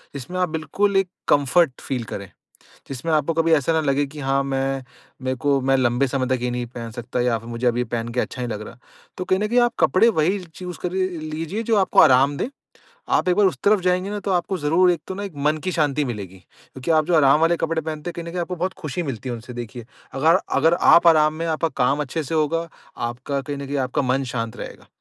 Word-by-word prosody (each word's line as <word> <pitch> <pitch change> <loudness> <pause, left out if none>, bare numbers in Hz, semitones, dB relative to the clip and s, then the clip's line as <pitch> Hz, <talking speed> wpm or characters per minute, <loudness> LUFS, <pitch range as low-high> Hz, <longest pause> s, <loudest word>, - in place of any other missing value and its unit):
जिसमें 140 +7 -6
आप 180 -2 +1
बिल्कुल 165 +6 -1
एक 195 -1 +2 0.2
कम्फर्ट 145 0 +3
फ़ील 130 -3 -3
करें, 100 -3 -7 0.6
जिसमें 135 +5 -3
आपको 155 +1 +2
कभी 165 0 +2
ऐसा 155 +2 +1
ना 160 - +2
लगे 140 -1 +1
कि 145 +2 -10
हाँ, 135 0 +1
मैं 135 -1 -2 0.4
मेरे 130 0 -1
को 140 +1 +1
मैं 135 +1 +2
लंबे 125 +1 +2
समय 130 0 -1
तक 125 - -9
ये 125 - 0
नहीं 120 0 -3
पहन 115 -1 -8
सकता 120 +1 -4
या 120 -2 +1
फिर 115 +1 -12
मुझे 120 +1 -3
अब 120 -1 +2
ये 125 - +1
पहन 115 0 -3
के 125 - 0
अच्छा - - -5
नहीं 120 - -3
लग 105 0 -5
रहा। - - -12 0.4
तो 185 - -2
कहीं 185 - +1
न 210 - 0
कहीं 245 +2 +3
आप 240 0 +3
कपड़े 225 +5 +5
वही 185 0 +1
चूज़ 175 +1 -9
कर 180 - -2
लीजिए, 175 +1 -3
जो 225 -1 +1
आपको 190 -2 +4
आराम 135 +3 +5
दें। 240 - -2 0.6
आप - - +2
एक 180 - +4
बार 205 -2 +5
उस 185 - -1
तरफ 205 0 +4
जाएँगे 185 +2 0
ना, 210 - -3
तो 200 - -3
आपको 185 +1 0
ज़रूर 165 +5 +3
एक 170 - -3
तो 190 - -5
ना, 200 - -5
एक 195 - -6
मन 155 +1 +3
की 185 - -1
शांति 150 -2 +1
मिलेगी 100 -7 -6
क्योंकि 130 - -10
आप 155 -1 +4
जो 180 - +1
आराम 145 0 +5
वाले 165 +1 +3
कपड़े 165 0 -1
पहनते 155 +1 -5
हैं, - - -11
कहीं 170 - -5
न - - -5
कहीं 180 +1 -3
आपको 180 +1 -3
बहुत 185 +3 -2
खुशी 155 +3 -3
मिलती 130 -5 -5
है 120 - -2
उनसे, 115 +2 -9
देखिए। 120 0 -7 0.3
अगर 160 +6 +4 0.2
अगर 165 +4 +4 0.2
आप 170 - +5
आराम 155 -2 +5
में 165 +1 -3
आपका 160 0 0 0.2
काम 140 +4 +2
अच्छे 150 +3 -3
से 160 - -4
होगा, 165 +2 0 0.3
आपका 130 +4 -3
कहीं 145 +1 -5
न 140 - -6
कहीं 140 +1 -3
आपका 130 - -1
मन 135 +1 0
शांत 115 -2 -3
रहेगा। - - -9
150 Hz, 250 wpm, -22 LUFS, 130-175 Hz, 0.6 s, कपड़े